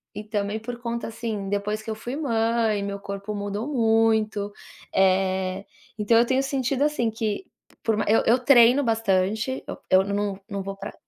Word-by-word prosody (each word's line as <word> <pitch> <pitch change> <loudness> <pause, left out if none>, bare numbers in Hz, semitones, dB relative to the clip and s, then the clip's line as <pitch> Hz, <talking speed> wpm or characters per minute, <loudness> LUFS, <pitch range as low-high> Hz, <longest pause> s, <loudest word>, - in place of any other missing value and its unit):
e 210 - -5
também 210 0 -2
por 240 +2 -6
conta, 235 -1 -4
assim, 220 -3 -4
depois 205 +2 -2
que 215 - -9
eu 220 - -2
fui 240 +4 -6
mãe 225 -6 +1
meu 200 0 -4
corpo 200 +1 -6
mudou 205 +3 -3
muito, 220 -5 +2 0.4
eh, 190 0 +1 0.3
então 210 +2 +2
eu 230 - +6
tenho 260 +2 +1
sentido, 275 0 0
assim, 295 -6 +1
que 220 - -3 0.4
por 220 -2 +1
ma - - 0
eu 220 - +4
eu 235 - +5
treino 250 +1 +6
bastante, 220 +2 0 0.3
eu 185 0 +5
não 200 0 -2
não 200 -1 -3
vou 195 +1 -5
pra 200 +1 -7
220 Hz, 175 wpm, -25 LUFS, 200-235 Hz, 0.4 s, eu